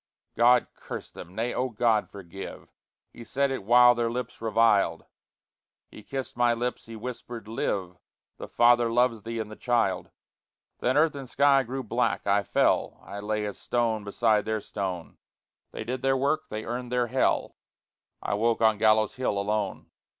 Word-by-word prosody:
God 120 Hz, +1 st, +5 dB
curse -, -, -8 dB
them! 90 Hz, -, -11 dB
Nay, 115 Hz, +3 st, -1 dB
Oh 130 Hz, +1 st, -1 dB
God 110 Hz, -1 st, +1 dB
forgive! 95 Hz, -1 st, -10 dB, 0.4 s
He 120 Hz, -, -10 dB
said 140 Hz, +3 st, 0 dB
it 130 Hz, -, -3 dB
while 120 Hz, +3 st, +7 dB
their 120 Hz, -1 st, -1 dB
lips 125 Hz, 0 st, -5 dB
reviled; 110 Hz, -6 st, +2 dB, 0.9 s
He -, -, -11 dB
kissed 135 Hz, +4 st, -6 dB
my 120 Hz, -1 st, +3 dB
lips, 120 Hz, 0 st, -4 dB
he 115 Hz, -, -8 dB
whispered: 120 Hz, -1 st, -7 dB
"Live! 95 Hz, -5 st, -3 dB, 0.4 s
The -, -, -7 dB
father 120 Hz, -1 st, +4 dB
loves 120 Hz, -2 st, +2 dB
thee 115 Hz, +2 st, -5 dB
in 110 Hz, -1 st, -4 dB
the 110 Hz, -, -9 dB
child." 115 Hz, -7 st, 0 dB, 0.7 s
Then 130 Hz, +3 st, +1 dB
earth 155 Hz, 0 st, +4 dB
and 135 Hz, -3 st, -8 dB
sky 140 Hz, 0 st, +4 dB
grew 130 Hz, +1 st, -5 dB
black, 120 Hz, +2 st, -1 dB
I 100 Hz, 0 st, +3 dB
fell -, -, +1 dB
I 100 Hz, -, -8 dB
lay 105 Hz, +1 st, -2 dB
as 105 Hz, -, -6 dB
stone 115 Hz, -3 st, 0 dB
beside 105 Hz, +1 st, +1 dB
their 110 Hz, 0 st, -1 dB
stone. 95 Hz, -5 st, -5 dB, 0.5 s
They -, -, -6 dB
did 125 Hz, +3 st, -4 dB
their 135 Hz, 0 st, +2 dB
work. 150 Hz, +4 st, 0 dB
They 110 Hz, 0 st, -5 dB
earned 120 Hz, +1 st, -5 dB
their 125 Hz, -1 st, +2 dB
Hell. 130 Hz, +3 st, 0 dB, 0.7 s
I -, -, -1 dB
woke 115 Hz, +2 st, +1 dB
on 110 Hz, -2 st, +3 dB
Gallows 110 Hz, +1 st, +3 dB
Hill, 125 Hz, -5 st, -1 dB
alone. 100 Hz, -1 st, -2 dB
115 Hz, 170 wpm, -27 LUFS, 105-125 Hz, 0.9 s, while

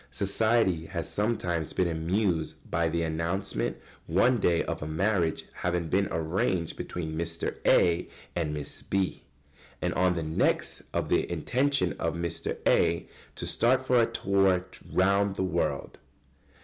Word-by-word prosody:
] -, -, -31 dB
Society 100 Hz, -4 st, +2 dB
has -, -, -4 dB
sometimes 90 Hz, -7 st, -1 dB
been 90 Hz, -, +1 dB
amused 80 Hz, -1 st, 0 dB, 0.2 s
by 85 Hz, -1 st, +1 dB
the 85 Hz, +1 st, 0 dB
announcement 85 Hz, +4 st, -2 dB, 0.3 s
one 115 Hz, +9 st, +3 dB
day 85 Hz, -4 st, +2 dB
of -, -, -4 dB
a 75 Hz, -, -4 dB
"marriage 85 Hz, +1 st, 0 dB
having 85 Hz, -2 st, -2 dB
been 100 Hz, +3 st, +2 dB
arranged 85 Hz, +1 st, -1 dB
between 80 Hz, -3 st, -5 dB
Mr. 85 Hz, 0 st, -2 dB
A. 85 Hz, -1 st, +4 dB, 0.3 s
and 80 Hz, -3 st, -1 dB
Miss 75 Hz, -1 st, -5 dB
B.," 95 Hz, -1 st, -1 dB, 0.6 s
and -, -, -1 dB
on 90 Hz, 0 st, +2 dB
the 85 Hz, -, -2 dB
next 80 Hz, +1 st, 0 dB
of -, -, -1 dB
the -, -, +1 dB
intention 130 Hz, -, +1 dB
of -, -, -1 dB
Mr. 85 Hz, -1 st, -3 dB
A. -, -, +3 dB, 0.3 s
to -, -, -4 dB
start 125 Hz, +3 st, +3 dB
for 130 Hz, -2 st, +3 dB
a 115 Hz, -, +3 dB
tour 95 Hz, -2 st, +2 dB, 0.3 s
round 100 Hz, +1 st, +3 dB
the 95 Hz, -, -1 dB
world. 85 Hz, -2 st, -2 dB
90 Hz, 150 wpm, -28 LUFS, 80-100 Hz, 0.6 s, A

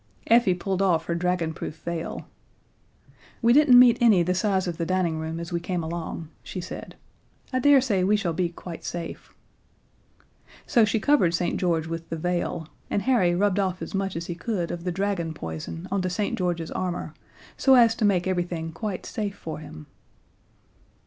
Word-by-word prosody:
Effie 230 Hz, -5 st, +4 dB
pulled 190 Hz, +1 st, -2 dB
off 180 Hz, -4 st, +2 dB
her 170 Hz, -, -1 dB
dragonproof 170 Hz, -3 st, -2 dB
veil. 170 Hz, -1 st, -4 dB, 1.1 s
"We 235 Hz, 0 st, +4 dB
didn't 285 Hz, -3 st, +7 dB
meet 245 Hz, -1 st, +7 dB
any 215 Hz, -7 st, +5 dB
the 180 Hz, +2 st, +1 dB
size 190 Hz, 0 st, +1 dB
of 170 Hz, -2 st, -3 dB
the 170 Hz, -, -2 dB
dining 180 Hz, -4 st, 0 dB
room 160 Hz, +1 st, -4 dB
as 170 Hz, +1 st, -6 dB
we 170 Hz, -, +1 dB
came 175 Hz, 0 st, -3 dB
along," 165 Hz, -1 st, -5 dB
she 185 Hz, -, -7 dB
said. 180 Hz, +2 st, -8 dB, 0.6 s
"I 255 Hz, -, +2 dB
daresay 260 Hz, -7 st, +4 dB
we 205 Hz, +3 st, +3 dB
shall 180 Hz, -6 st, -1 dB
be 175 Hz, +1 st, 0 dB
quite 170 Hz, 0 st, -9 dB
safe." 170 Hz, -1 st, -6 dB, 1.3 s
So 235 Hz, -6 st, +4 dB
she 215 Hz, +1 st, 0 dB
covered 215 Hz, -, +3 dB
St. 175 Hz, +1 st, -1 dB
George 165 Hz, -3 st, +1 dB
with 165 Hz, 0 st, -6 dB
the 165 Hz, -, -3 dB
veil, 175 Hz, -1 st, -2 dB, 0.2 s
and 200 Hz, -, 0 dB
Harry 220 Hz, -10 st, +3 dB
rubbed 200 Hz, +1 st, +2 dB
off 185 Hz, -2 st, 0 dB
as -, -, -7 dB
much 195 Hz, -1 st, -2 dB
as 165 Hz, +1 st, -4 dB
he 175 Hz, -, -4 dB
could 175 Hz, 0 st, -3 dB
of 175 Hz, 0 st, -6 dB
the 180 Hz, -, 0 dB
dragon 180 Hz, -3 st, -2 dB
poison 80 Hz, -, -6 dB
onto 185 Hz, -2 st, 0 dB
St. 200 Hz, +3 st, -1 dB
George's 175 Hz, -3 st, -2 dB
armor, 180 Hz, -1 st, -3 dB, 0.4 s
so 265 Hz, -1 st, +5 dB
as 230 Hz, -2 st, +6 dB
to 230 Hz, -, -1 dB
make 190 Hz, -4 st, +3 dB
everything 175 Hz, -3 st, -2 dB
quite 195 Hz, +3 st, -5 dB
safe 205 Hz, -4 st, -4 dB
for 160 Hz, -5 st, -7 dB
him. 75 Hz, -, -10 dB
180 Hz, 180 wpm, -25 LUFS, 170-205 Hz, 1.3 s, didn't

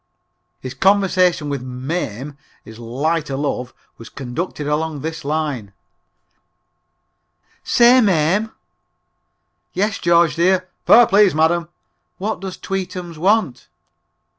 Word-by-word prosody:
His 130 Hz, -1 st, -6 dB
conversation 185 Hz, -5 st, +2 dB
with 140 Hz, -3 st, -3 dB
"Mame," 130 Hz, 0 st, -5 dB, 0.3 s
his 110 Hz, +1 st, -12 dB
light 145 Hz, +7 st, -2 dB
o' 135 Hz, -, -3 dB
love, 130 Hz, -3 st, -3 dB, 0.3 s
was 115 Hz, -, -11 dB
conducted 145 Hz, +4 st, -5 dB
along 150 Hz, 0 st, -2 dB
this 160 Hz, 0 st, -5 dB
line: 140 Hz, -9 st, -3 dB, 1.9 s
"Say, 245 Hz, +2 st, +5 dB
Mame." 195 Hz, +2 st, +1 dB, 1.2 s
"Yes, 205 Hz, +2 st, -1 dB
George, 170 Hz, -1 st, +3 dB
dear 185 Hz, +2 st, +2 dB, 0.2 s
(fare, 240 Hz, +1 st, +8 dB
please, 205 Hz, -6 st, +4 dB
madam). 165 Hz, +2 st, +1 dB, 0.5 s
What 210 Hz, +1 st, -3 dB
does 190 Hz, -1 st, -7 dB
tweetums 180 Hz, -3 st, -5 dB
want?" 190 Hz, -, +1 dB
165 Hz, 105 wpm, -19 LUFS, 140-190 Hz, 1.9 s, fare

